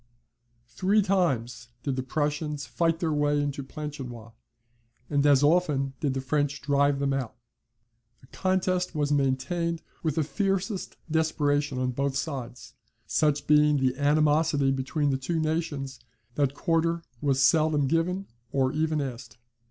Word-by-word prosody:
Three 200 Hz, -, +2 dB
times 135 Hz, -, 0 dB, 0.2 s
did 140 Hz, -2 st, -1 dB
the 130 Hz, -, -1 dB
Prussians 150 Hz, +1 st, -2 dB
fight 165 Hz, +3 st, 0 dB
their 165 Hz, -3 st, 0 dB
way 145 Hz, 0 st, +2 dB
into 145 Hz, -1 st, -2 dB
Planchenoit, 135 Hz, -5 st, -7 dB, 0.8 s
and 145 Hz, -1 st, +2 dB
as 140 Hz, -1 st, +5 dB
often 145 Hz, -4 st, +2 dB
did 140 Hz, -3 st, -1 dB
the 135 Hz, -, -1 dB
French 145 Hz, +1 st, 0 dB
drive 140 Hz, 0 st, +2 dB
them 140 Hz, 0 st, 0 dB
out: 130 Hz, -4 st, -3 dB, 0.8 s
the -, -, -19 dB
contest 185 Hz, +3 st, -1 dB
was 145 Hz, -1 st, 0 dB
maintained 160 Hz, +5 st, 0 dB, 0.2 s
with 155 Hz, -3 st, -1 dB
the 160 Hz, -, +2 dB
fiercest 195 Hz, +3 st, -2 dB
desperation 145 Hz, -3 st, +1 dB
on 130 Hz, 0 st, 0 dB
both 140 Hz, +2 st, -1 dB
sides, 130 Hz, -5 st, -5 dB, 0.3 s
such 150 Hz, -2 st, +1 dB
being 150 Hz, 0 st, +5 dB
the 130 Hz, -1 st, +1 dB
animosity 145 Hz, 0 st, +2 dB
between 135 Hz, +2 st, 0 dB
the 135 Hz, -, +1 dB
two 160 Hz, +5 st, -2 dB
nations 155 Hz, -5 st, -2 dB, 0.3 s
that 140 Hz, 0 st, 0 dB
quarter 165 Hz, +1 st, 0 dB, 0.2 s
was 140 Hz, -2 st, +1 dB
seldom 150 Hz, +1 st, +4 dB
given 170 Hz, +6 st, 0 dB, 0.3 s
or 130 Hz, -1 st, +1 dB
even 155 Hz, 0 st, 0 dB
asked. 120 Hz, -5 st, -6 dB
145 Hz, 140 wpm, -27 LUFS, 135-160 Hz, 0.8 s, as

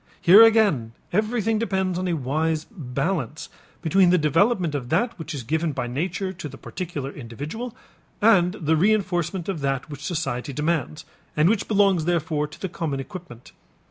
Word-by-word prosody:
Here 195 Hz, +6 st, +8 dB
again 210 Hz, -, +4 dB, 0.2 s
everything 215 Hz, +1 st, +1 dB
depends 190 Hz, -5 st, -1 dB
upon 185 Hz, -, -2 dB
a 175 Hz, -, 0 dB
wise 155 Hz, +4 st, -1 dB
balance 150 Hz, -, -3 dB, 0.3 s
between 180 Hz, +2 st, +4 dB
the 180 Hz, -, +5 dB
development 170 Hz, -, +2 dB
of 130 Hz, -4 st, -4 dB
that 215 Hz, -, +1 dB
which 160 Hz, -1 st, -5 dB
is 135 Hz, -, -5 dB
given 160 Hz, +5 st, -1 dB
by 120 Hz, -, -3 dB
nature 180 Hz, +9 st, -3 dB
to 170 Hz, -5 st, -7 dB
the 135 Hz, -, -11 dB
particular 155 Hz, -7 st, -5 dB
individual 145 Hz, -, -7 dB, 0.4 s
and 190 Hz, -5 st, +4 dB
the 160 Hz, -4 st, 0 dB
reënforcement 185 Hz, -2 st, +1 dB
of 185 Hz, -6 st, -3 dB
that 135 Hz, +1 st, -2 dB
which 145 Hz, 0 st, -8 dB
society 140 Hz, -6 st, -3 dB
demands 155 Hz, 0 st, -2 dB, 0.3 s
and 150 Hz, +2 st, +4 dB
which 205 Hz, +1 st, +1 dB
belongs 195 Hz, -6 st, +3 dB
therefore 160 Hz, -3 st, 0 dB
to 150 Hz, -, -14 dB
the 190 Hz, -, -3 dB
common 160 Hz, -5 st, -3 dB
equipment. 135 Hz, -5 st, -9 dB
165 Hz, 165 wpm, -24 LUFS, 145-190 Hz, 0.4 s, Here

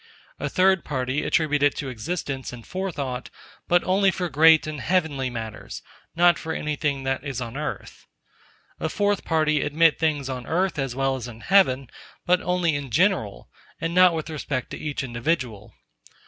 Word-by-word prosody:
A -, -, -2 dB
third 190 Hz, -1 st, +3 dB
party 130 Hz, 0 st, -2 dB
attribute 150 Hz, -2 st, +1 dB, 0.2 s
to 145 Hz, -, -4 dB
it -, -, -4 dB
existence 135 Hz, +1 st, -4 dB
and 120 Hz, -2 st, -10 dB
forethought, 145 Hz, -10 st, -4 dB, 0.4 s
but 175 Hz, 0 st, +3 dB
only 195 Hz, +1 st, +3 dB
for 180 Hz, -1 st, -2 dB
great 160 Hz, +2 st, +6 dB
and 155 Hz, -3 st, -5 dB
heavenly 150 Hz, -6 st, 0 dB
matters, 110 Hz, -3 st, -7 dB, 0.3 s
not 175 Hz, +1 st, +5 dB
for 160 Hz, -1 st, -4 dB
anything 150 Hz, -3 st, -2 dB
that 135 Hz, 0 st, -1 dB
is 135 Hz, -4 st, -4 dB
on 115 Hz, -1 st, -6 dB
earth. 150 Hz, +1 st, -6 dB, 0.7 s
A -, -, -1 dB
fourth 205 Hz, -1 st, 0 dB
party 155 Hz, -2 st, +1 dB
admit 160 Hz, +2 st, +3 dB
things 150 Hz, -4 st, 0 dB
on 125 Hz, -2 st, -5 dB
earth 180 Hz, -1 st, 0 dB
as 135 Hz, -3 st, -2 dB
well 135 Hz, 0 st, +1 dB
as 125 Hz, -2 st, -6 dB
in 120 Hz, -1 st, -11 dB
heaven, 140 Hz, -10 st, +3 dB, 0.4 s
but 180 Hz, +1 st, +3 dB
only 180 Hz, -3 st, +1 dB
in 140 Hz, -2 st, -4 dB
general, -, -, +1 dB, 0.3 s
and 165 Hz, +1 st, -2 dB
not 180 Hz, -1 st, +6 dB
with 160 Hz, 0 st, -4 dB
respect 140 Hz, -4 st, -4 dB
to -, -, -6 dB
each 150 Hz, -2 st, -3 dB
individual. 120 Hz, -4 st, -2 dB
150 Hz, 170 wpm, -24 LUFS, 130-170 Hz, 0.7 s, great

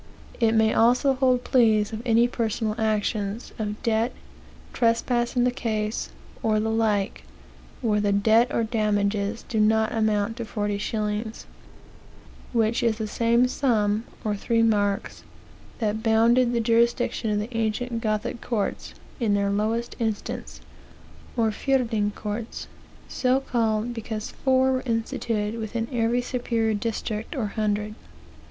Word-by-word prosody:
It 225 Hz, -2 st, +3 dB
may 220 Hz, 0 st, +4 dB
also 250 Hz, +4 st, +4 dB
hold 255 Hz, -1 st, +2 dB
plea 230 Hz, -5 st, +4 dB
of 215 Hz, +1 st, -4 dB
any 230 Hz, +1 st, +4 dB
personal 225 Hz, -2 st, -1 dB
actions, 215 Hz, 0 st, -1 dB
of 210 Hz, -1 st, -3 dB
debt, 230 Hz, +2 st, +1 dB, 0.6 s
trespass 240 Hz, +1 st, +1 dB
in 245 Hz, -, +3 dB
the 250 Hz, -, +3 dB
case, 220 Hz, -4 st, -2 dB, 0.3 s
or 215 Hz, -1 st, +2 dB
the 220 Hz, +1 st, 0 dB
like, 210 Hz, -, 0 dB, 0.6 s
where 210 Hz, -3 st, +2 dB
the 205 Hz, -1 st, +1 dB
debt 220 Hz, +4 st, +4 dB
or 230 Hz, -, +1 dB
damages 210 Hz, -1 st, 0 dB
do 220 Hz, -, -1 dB
not 220 Hz, +1 st, +3 dB
amount 215 Hz, 0 st, 0 dB
to 235 Hz, -, -4 dB
forty 205 Hz, -2 st, -2 dB
shillings; 215 Hz, +1 st, -3 dB, 1.1 s
which 230 Hz, -1 st, +1 dB
is 230 Hz, -2 st, +1 dB
the 220 Hz, -, -2 dB
same 235 Hz, +3 st, +2 dB
sum, 220 Hz, -5 st, +1 dB, 0.2 s
or 210 Hz, -1 st, 0 dB
three 230 Hz, +3 st, +1 dB
marks, 205 Hz, -3 st, 0 dB, 0.6 s
that 220 Hz, -1 st, -1 dB
bounded 235 Hz, +2 st, +4 dB
the 235 Hz, -, +1 dB
jurisdiction 230 Hz, 0 st, +1 dB
of 210 Hz, -, +1 dB
the 220 Hz, +3 st, -4 dB
ancient 230 Hz, +1 st, -1 dB
Gothic 215 Hz, +1 st, -2 dB
courts 220 Hz, -5 st, -3 dB, 0.2 s
in 215 Hz, -4 st, +2 dB
their 200 Hz, 0 st, +1 dB
lowest 220 Hz, +3 st, -1 dB
instance, 215 Hz, -, -4 dB, 0.8 s
or 225 Hz, -2 st, +2 dB
fierding 225 Hz, -3 st, 0 dB
courts, 215 Hz, +2 st, -5 dB, 0.4 s
so 255 Hz, +1 st, +1 dB
called 230 Hz, -3 st, 0 dB
because 220 Hz, -2 st, -5 dB
four 260 Hz, 0 st, +2 dB
were 260 Hz, 0 st, -1 dB
institute 225 Hz, -1 st, -2 dB
within 225 Hz, +1 st, -3 dB
every 240 Hz, 0 st, +1 dB
superior 235 Hz, -3 st, -1 dB
district 215 Hz, +1 st, -3 dB
or 250 Hz, -6 st, -1 dB
hundred." 210 Hz, -1 st, -1 dB
225 Hz, 135 wpm, -25 LUFS, 210-235 Hz, 1.1 s, may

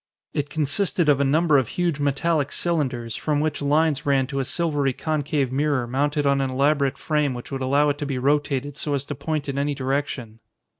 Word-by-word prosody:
It 145 Hz, 0 st, -2 dB
consisted 160 Hz, +3 st, 0 dB
of 140 Hz, -1 st, +4 dB
a -, -, +4 dB
number 150 Hz, +1 st, +4 dB
of 130 Hz, -, -1 dB
huge 170 Hz, -1 st, -1 dB
metallic 145 Hz, +1 st, 0 dB
cylinders, 130 Hz, -9 st, -1 dB
from 150 Hz, -2 st, 0 dB
which 155 Hz, 0 st, -1 dB
lines 150 Hz, 0 st, +2 dB
ran 135 Hz, -2 st, +2 dB
to 135 Hz, -, 0 dB
a 135 Hz, -, -1 dB
silvery 145 Hz, -4 st, 0 dB
concave 145 Hz, -3 st, -1 dB
mirror 140 Hz, -2 st, +1 dB
mounted 145 Hz, +4 st, 0 dB
on 140 Hz, 0 st, +3 dB
an 135 Hz, -, 0 dB
elaborate 140 Hz, +1 st, +1 dB
frame 150 Hz, -4 st, 0 dB
which 120 Hz, -, -8 dB
would 135 Hz, -1 st, -3 dB
allow 140 Hz, +3 st, +3 dB
it 145 Hz, 0 st, -2 dB
to 145 Hz, -, -3 dB
be 135 Hz, -2 st, -2 dB
rotated 145 Hz, +1 st, 0 dB
so 145 Hz, -2 st, -1 dB
as 140 Hz, 0 st, -3 dB
to 145 Hz, -, -4 dB
point 145 Hz, +1 st, -3 dB
in 140 Hz, 0 st, -2 dB
any 145 Hz, 0 st, 0 dB
direction. 130 Hz, -4 st, -3 dB
145 Hz, 205 wpm, -23 LUFS, 135-150 Hz, -, of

